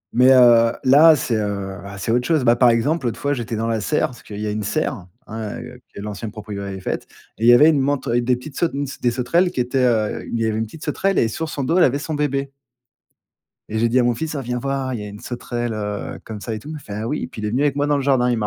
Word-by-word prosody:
Mais, 125 Hz, +2 st, +6 dB
heu, 120 Hz, -2 st, +6 dB
là, 150 Hz, +5 st, +7 dB
c'est, 120 Hz, -4 st, -1 dB
heu, 100 Hz, -2 st, -3 dB
bah 100 Hz, 0 st, -9 dB
c'est 100 Hz, +4 st, -2 dB
autre 125 Hz, +1 st, +1 dB
chose. 155 Hz, -5 st, +2 dB
Bah, 120 Hz, -1 st, +5 dB
par 125 Hz, 0 st, +5 dB
exemple, 130 Hz, +5 st, +1 dB
l'autre 115 Hz, -, -3 dB
fois, 145 Hz, 0 st, 0 dB
j'étais 120 Hz, -3 st, -4 dB
dans 110 Hz, +1 st, -2 dB
la 115 Hz, -2 st, -1 dB
serre, 155 Hz, +5 st, 0 dB
parce 125 Hz, -, -13 dB
qu'il 105 Hz, -1 st, -9 dB
y 105 Hz, -, -3 dB
a 105 Hz, -, -1 dB
une 105 Hz, +1 st, -3 dB
serre, 100 Hz, -, -2 dB, 0.2 s
hein, 110 Hz, -1 st, -6 dB
heu, 125 Hz, +1 st, -10 dB, 0.2 s
que -, -, -7 dB
l'ancienne 105 Hz, +2 st, -5 dB
proprio 105 Hz, -2 st, -7 dB
avait 100 Hz, -1 st, -5 dB
faite, -, -, -4 dB, 0.3 s
et 115 Hz, -, 0 dB
il -, -, +5 dB
y -, -, +9 dB
avait 150 Hz, +6 st, +7 dB
une 150 Hz, -3 st, +3 dB
mante, 140 Hz, 0 st, 0 dB
avec 120 Hz, 0 st, +1 dB
des 125 Hz, +1 st, +2 dB
petites 135 Hz, +4 st, -10 dB
saut 170 Hz, -, +2 dB
une 140 Hz, +1 st, -2 dB, 0.2 s
des 120 Hz, -, +3 dB
sauterelles 130 Hz, +9 st, +1 dB
qui 175 Hz, -, -5 dB
étaient, 125 Hz, +1 st, +1 dB
heu, 110 Hz, -4 st, +1 dB
il 115 Hz, -, -1 dB
y 115 Hz, -, +1 dB
avait 110 Hz, -1 st, -1 dB
une 110 Hz, -, -1 dB
petite 150 Hz, +9 st, -11 dB
sauterelle 195 Hz, +6 st, 0 dB
et 115 Hz, -, +3 dB
sur 160 Hz, +7 st, -4 dB
son 140 Hz, -, -3 dB
dos 165 Hz, +7 st, +1 dB
elle -, -, +6 dB
avait 135 Hz, -1 st, +3 dB
son 155 Hz, +2 st, -5 dB
bébé. 140 Hz, -2 st, -1 dB, 1.2 s
Et 110 Hz, -, -3 dB
j'ai 115 Hz, +1 st, +2 dB
dit 125 Hz, +3 st, +2 dB
à 125 Hz, -, +3 dB
mon 120 Hz, -, +2 dB
fils: 155 Hz, +6 st, -4 dB
«Ah 135 Hz, -, -3 dB
viens 125 Hz, 0 st, -3 dB
voir, 135 Hz, -1 st, -2 dB
il 115 Hz, -, -4 dB
y -, -, -5 dB
a -, -, -7 dB
une 105 Hz, 0 st, -9 dB
sauterelle, 120 Hz, -1 st, -4 dB
heu, 105 Hz, -1 st, -5 dB
comme 110 Hz, -2 st, -7 dB
ça 115 Hz, +1 st, -4 dB
et -, -, -4 dB
tout», 150 Hz, -, -12 dB
il 155 Hz, -, -5 dB
me -, -, -6 dB
fait: 105 Hz, -, -11 dB
«Ah 110 Hz, +2 st, -3 dB
oui» 150 Hz, -, -2 dB
et -, -, -3 dB
puis 110 Hz, -, -9 dB
il -, -, -1 dB
est -, -, -1 dB
venu 130 Hz, +6 st, 0 dB
avec 145 Hz, -2 st, +2 dB
moi 145 Hz, 0 st, 0 dB
dans 145 Hz, -, +2 dB
le 140 Hz, -, -1 dB
jardin, 130 Hz, -3 st, +2 dB
il 120 Hz, -, 0 dB
m'a 105 Hz, -, -1 dB
120 Hz, 315 wpm, -21 LUFS, 110-140 Hz, 1.2 s, y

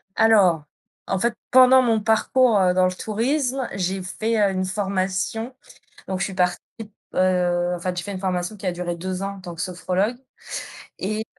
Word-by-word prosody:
alors 195 Hz, -9 st, +4 dB, 0.4 s
en 190 Hz, -, 0 dB
fait 235 Hz, +4 st, +1 dB, 0.2 s
pendant 260 Hz, 0 st, +7 dB
mon 225 Hz, -3 st, +2 dB
parcours, 225 Hz, +1 st, +3 dB
heu, 180 Hz, -1 st, +3 dB
dans 185 Hz, 0 st, +3 dB
le 185 Hz, -, 0 dB
tourisme, 250 Hz, +5 st, -1 dB
j'ai 190 Hz, 0 st, -2 dB
fait, 220 Hz, +5 st, -2 dB
heu, 200 Hz, -, +3 dB
une 185 Hz, 0 st, -1 dB
formation 195 Hz, +4 st, -2 dB, 0.6 s
donc 190 Hz, -1 st, -2 dB
je -, -, +2 dB
suis 195 Hz, -, -5 dB
partie, 180 Hz, -1 st, +1 dB, 0.5 s
heu 180 Hz, -1 st, +2 dB
en -, -, -7 dB
fait 180 Hz, 0 st, -3 dB
j'ai 175 Hz, -, -2 dB
fait 200 Hz, +2 st, -6 dB
une 185 Hz, -, -5 dB
formation 185 Hz, +1 st, -2 dB
qui 195 Hz, -, -8 dB
a 180 Hz, -, +1 dB
duré 175 Hz, 0 st, -4 dB
2 185 Hz, +2 st, -4 dB
ans 200 Hz, 0 st, -4 dB
en -, -, -12 dB
tant 175 Hz, -2 st, -8 dB
que 165 Hz, -, -9 dB
sophrologue 185 Hz, +5 st, -1 dB, 0.8 s
et 215 Hz, +3 st, -2 dB
190 Hz, 190 wpm, -23 LUFS, 180-220 Hz, 0.8 s, pendant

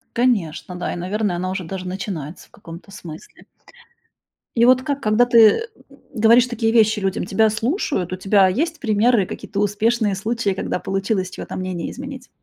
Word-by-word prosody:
Конечно, 205 Hz, -8 st, 0 dB
да, 180 Hz, -, -3 dB
и, -, -, -5 dB
наверное, 190 Hz, +1 st, -2 dB
она 185 Hz, +1 st, -3 dB
уже 190 Hz, 0 st, -4 dB
даже 185 Hz, +2 st, -6 dB
начинается 180 Hz, -5 st, -6 dB
в -, -, -38 dB
каком-то 170 Hz, +1 st, -12 dB
смысле. 165 Hz, -5 st, -11 dB, 1.1 s
И 235 Hz, 0 st, +4 dB
вот 255 Hz, +1 st, +5 dB
ка 285 Hz, +1 st, -1 dB
когда 230 Hz, -2 st, +2 dB
ты, 245 Hz, -1 st, +2 dB
э, 220 Hz, -2 st, +7 dB, 0.5 s
говоришь 230 Hz, +1 st, +5 dB
такие 230 Hz, -2 st, -1 dB
вещи 220 Hz, -2 st, +4 dB
людям, 195 Hz, -2 st, -2 dB
тебя 220 Hz, +4 st, +2 dB
слушают? 225 Hz, -, -2 dB
У 185 Hz, -, -3 dB
тебя 195 Hz, +1 st, +4 dB
есть 320 Hz, -, -2 dB
примеры, 220 Hz, -2 st, +2 dB
какие-то 200 Hz, +2 st, -5 dB
успешные 210 Hz, +1 st, +1 dB
случаи, 220 Hz, +2 st, -2 dB
когда 190 Hz, -, -3 dB
получилось 195 Hz, 0 st, -2 dB
чье-то -, -, -8 dB
мнение 185 Hz, -2 st, -4 dB
изменить? 265 Hz, -1 st, -9 dB
210 Hz, 170 wpm, -21 LUFS, 185-235 Hz, 1.1 s, э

